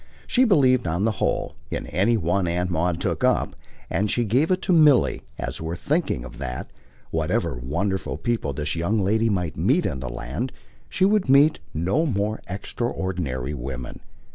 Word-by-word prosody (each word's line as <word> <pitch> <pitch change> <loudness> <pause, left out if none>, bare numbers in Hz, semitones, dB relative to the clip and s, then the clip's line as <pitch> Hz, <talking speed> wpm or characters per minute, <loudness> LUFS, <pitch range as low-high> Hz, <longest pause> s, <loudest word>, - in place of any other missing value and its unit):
She 255 +1 +3
believed, 130 - +4
on 85 +5 0
the 115 - +3
whole, - - 0 0.2
in - - -3
any 100 +8 +2
one 90 0 0
Aunt 90 +2 -1
Maud 85 +1 0
took - - -2
up; - - +2 0.3
and 105 +2 0
she 120 - +1
gave 125 +9 +2
it 185 0 +2
to 185 - +2
Milly 150 -5 +5 0.2
as - - -5
worth 80 +2 -4
thinking 150 - 0
of - - -11
that, 60 -3 -5 0.4
whatever 80 +2 0
wonderful 75 +4 -2
people 115 -3 -1
this 75 +3 -2
young 85 +7 0
lady 110 +4 +2
might 90 -6 -1
meet 130 - +2
in 65 - -2
the 65 -2 -5
land, 65 - -4 0.4
she 190 - +2
would 200 -6 +2
meet 145 +4 +5
no 95 - +1
more 110 -3 -1
extraordinary 90 - -3
woman. 65 -2 -6
95 Hz, 170 wpm, -24 LUFS, 80-125 Hz, 0.4 s, Milly